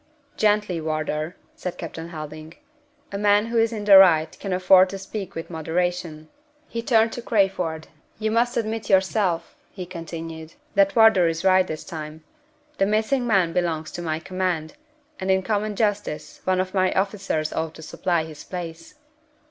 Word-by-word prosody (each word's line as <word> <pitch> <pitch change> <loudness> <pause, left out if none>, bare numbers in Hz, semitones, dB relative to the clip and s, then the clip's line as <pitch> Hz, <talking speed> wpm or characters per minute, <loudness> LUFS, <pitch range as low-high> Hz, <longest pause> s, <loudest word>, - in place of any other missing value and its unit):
"Gently, 210 -5 +1
Wardour," 155 +1 -2 0.2
said 180 - -5
Captain 165 0 -7
Helding. 155 0 -8 0.6
"A 200 - -4
man 205 +1 +4
who 230 0 0
is 225 0 +2
in 215 -2 -4
the 200 -2 +9
right 160 -4 +5
can 195 - -5
afford 185 0 +5
to 195 - -5
speak 195 0 -7
with 165 +1 -6
moderation." 165 -1 -2 0.4
He 230 - -4
turned 225 -1 +3
to 240 - -6
Crayford. 190 -8 0 0.3
"You 220 0 -1
must 235 +2 +1
admit 220 -1 -2
yourself," 190 -2 +1
he 185 -2 -7
continued, 165 -2 -8 0.2
"that 195 0 +3
Wardour 220 -6 +6
is 165 +2 -2
right 185 -1 +5
this 155 - -5
time. 155 -1 -8 0.6
The 195 - +3
missing 220 +4 +1
man 190 -7 +2
belongs 165 -3 -1
to 175 - -6
my 160 -2 -2
command, 180 -2 -2 0.5
and 190 - -3
in 190 0 +3
common 210 0 -1
justice 205 -8 -2
one 185 0 +2
of 185 0 -2
my 185 -1 +2
officers 190 -6 -1
ought 160 0 -3
to 160 - -11
supply 170 +1 -1
his 155 -2 -10
place." 170 - -7
185 Hz, 165 wpm, -24 LUFS, 160-205 Hz, 0.6 s, the